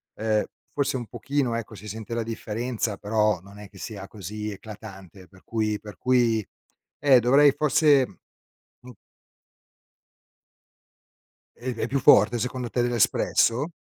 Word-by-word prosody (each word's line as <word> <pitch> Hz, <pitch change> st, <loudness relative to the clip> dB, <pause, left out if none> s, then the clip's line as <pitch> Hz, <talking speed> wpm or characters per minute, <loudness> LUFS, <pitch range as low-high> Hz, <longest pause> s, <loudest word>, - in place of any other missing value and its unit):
ehm, 110 Hz, -1 st, 0 dB, 0.3 s
forse 140 Hz, -2 st, -1 dB
un 120 Hz, -, -3 dB
pochino, 140 Hz, -4 st, -2 dB
ecco, 115 Hz, -1 st, -5 dB
si 105 Hz, +1 st, -10 dB
sente 110 Hz, +2 st, -6 dB
la 115 Hz, -1 st, -1 dB
differenza, 115 Hz, 0 st, -3 dB
però, 105 Hz, -3 st, +1 dB
non 100 Hz, +2 st, -14 dB
è 105 Hz, -, -10 dB
che 95 Hz, -, -17 dB
sia 100 Hz, -1 st, -7 dB
così 105 Hz, +2 st, -6 dB
eclatante, 100 Hz, -3 st, -11 dB
per 95 Hz, -1 st, -21 dB
cui 110 Hz, -2 st, -2 dB
per 105 Hz, -1 st, -11 dB
cui, 120 Hz, -4 st, +2 dB, 0.6 s
eh, 135 Hz, -4 st, +5 dB
dovrei, 140 Hz, +4 st, +5 dB
forse 145 Hz, -2 st, +4 dB, 0.7 s
mh. 125 Hz, 0 st, -13 dB, 2.6 s
E 125 Hz, +1 st, -5 dB
è 115 Hz, -, -2 dB
più 135 Hz, +2 st, 0 dB
forte, 115 Hz, 0 st, +5 dB
secondo 125 Hz, 0 st, -3 dB
te, 120 Hz, -, 0 dB
dell'espresso? 120 Hz, -, +2 dB
110 Hz, 135 wpm, -25 LUFS, 105-125 Hz, 2.6 s, eh